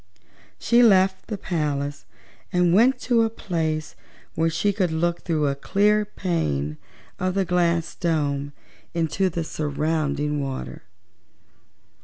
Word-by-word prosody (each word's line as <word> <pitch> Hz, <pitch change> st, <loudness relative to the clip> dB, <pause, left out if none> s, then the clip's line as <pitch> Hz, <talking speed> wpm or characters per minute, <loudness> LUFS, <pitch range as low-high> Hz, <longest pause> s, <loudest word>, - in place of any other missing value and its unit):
She 235 Hz, +1 st, +3 dB
left 190 Hz, -4 st, +4 dB
the 215 Hz, -, -4 dB
palace 145 Hz, -6 st, -2 dB, 0.5 s
and 180 Hz, -1 st, +3 dB
went 245 Hz, +7 st, +5 dB
to 240 Hz, -2 st, +2 dB
a 225 Hz, -, +2 dB
place 160 Hz, -7 st, -3 dB, 0.4 s
where 165 Hz, 0 st, +1 dB
she 200 Hz, +5 st, 0 dB
could 185 Hz, -3 st, +1 dB
look 170 Hz, +2 st, -1 dB
through 160 Hz, -4 st, 0 dB
a 140 Hz, -, +1 dB
clear 210 Hz, +8 st, +2 dB
pane 75 Hz, -, -2 dB, 0.4 s
of 185 Hz, 0 st, -1 dB
the 195 Hz, -1 st, +1 dB
glass 170 Hz, -2 st, +1 dB
dome 145 Hz, -4 st, -1 dB, 0.4 s
into 170 Hz, +3 st, +1 dB
the 170 Hz, -1 st, -3 dB
surrounding 150 Hz, -1 st, -1 dB
water. 135 Hz, -1 st, -5 dB
170 Hz, 125 wpm, -24 LUFS, 150-190 Hz, 0.5 s, went